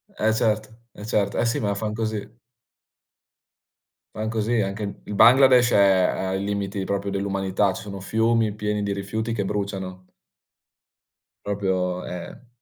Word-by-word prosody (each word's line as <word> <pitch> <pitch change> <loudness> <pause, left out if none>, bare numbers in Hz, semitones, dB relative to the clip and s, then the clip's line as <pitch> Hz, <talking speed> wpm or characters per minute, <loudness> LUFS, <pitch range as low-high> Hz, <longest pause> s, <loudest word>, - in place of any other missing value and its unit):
Eh 110 0 +1
certo, 110 -2 0 0.2
eh 105 - -10
certo. 100 -2 0
Eh - - +2
sì, 115 - 0
ma 100 -2 0
fan 105 +1 -3
così. 110 0 -4 1.8
Fan 110 0 -3
così, 110 +1 0
anche 100 +1 -4
il 105 - -7
Bangladesh, 125 +2 +6
è - - +3 0.4
è - - -3
ai 95 +1 -1
limiti 100 -1 -2
proprio, 100 0 -2
dell'umanità, 100 0 0
ci 110 - -7
sono 100 -2 -7
fiumi 110 +1 +1
pieni 105 0 -2
di 100 0 -1
rifiuti 110 +4 -3
che 105 -3 -1
bruciano. 95 -2 -4 1.4
Proprio, 95 -3 -1
ehm 90 +7 -8
105 Hz, 145 wpm, -24 LUFS, 100-110 Hz, 1.8 s, Bangladesh